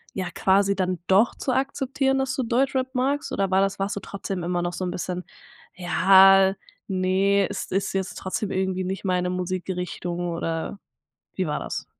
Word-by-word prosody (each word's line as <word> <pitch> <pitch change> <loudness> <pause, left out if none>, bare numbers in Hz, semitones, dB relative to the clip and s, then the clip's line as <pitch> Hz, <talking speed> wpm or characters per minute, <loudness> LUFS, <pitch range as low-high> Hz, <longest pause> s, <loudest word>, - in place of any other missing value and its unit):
ja 190 -1 -3
quasi 200 +1 +3
dann 185 -2 -1
doch 200 +5 +4
zu 265 - -2
akzeptieren, 270 0 0
dass 265 0 -1
du 260 - -1
Deutschrap 260 +2 0
magst 275 +3 -1
oder 195 -1 0
war 190 +1 +3
das 195 0 0
warst 195 +1 -1
du - - -3
trotzdem 195 -2 -5
immer 175 0 -1
noch 175 0 -2
so 180 - -4
'n 180 - -2
bisschen, 180 0 -4 0.5
„ja, 190 +2 +6 0.3
ne, 190 +1 +2
es - - -5
ist 195 +1 -1
jetzt 190 -1 -2
trotzdem 195 +2 -3
irgendwie 190 0 -1
nicht 190 +2 -4
meine 180 -1 +1
Musikrichtung“ 180 -1 -3
oder 165 +3 -3 0.6
wie 185 - -1
war 150 -2 -2
das? - - -5
190 Hz, 175 wpm, -24 LUFS, 180-200 Hz, 0.6 s, ja